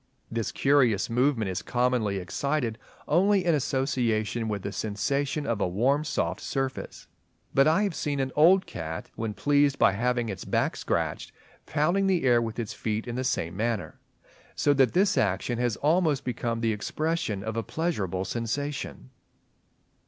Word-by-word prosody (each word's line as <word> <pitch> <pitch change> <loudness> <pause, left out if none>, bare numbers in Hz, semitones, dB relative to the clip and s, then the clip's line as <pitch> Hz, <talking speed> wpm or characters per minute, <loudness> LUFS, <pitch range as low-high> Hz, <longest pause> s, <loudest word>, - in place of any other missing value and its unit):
This 115 -1 -2
curious 125 -8 +2
movement 120 -4 +1
is 90 - -3
commonly 120 -5 0
excited 120 +4 -2 0.3
only 190 +4 +3
in 170 - +3
association 120 -5 0
with 105 -3 -3
the 100 - -3
sensation 140 +9 -1
of 115 -3 -1
a - - +2
warm 130 +11 +1
soft 150 - -2
surface; 135 -1 -4 0.5
but 135 +2 +5
I 165 +7 +3
have 200 -4 0
seen 145 -2 -2
an 135 -1 -1
old 180 +5 +6
cat, 80 -1 -6
when 110 -2 -4
pleased 145 +1 +2
by 110 -3 +5
having 120 +3 0
its 95 -3 -5
back - - 0
scratched, - - -2 0.4
pounding 175 +6 +1
the 185 -3 +2
air 120 -2 +4
with 115 -1 -4
its 115 -3 -3
feet 110 +1 -3
in 120 - -4
the 130 +2 -2
same 85 -10 -1
manner; 115 +1 -2 0.6
so 145 - +3
that 135 -4 +3
this 200 +3 +3
action 105 +4 0
has 120 -3 +1
almost 155 -2 +2
become 115 -2 -2
the 115 -1 +1
expression 110 -2 -2
of 110 +1 -4
a 115 - 0
pleasurable 105 - -2
sensation. 115 - -4
125 Hz, 160 wpm, -27 LUFS, 110-145 Hz, 0.6 s, old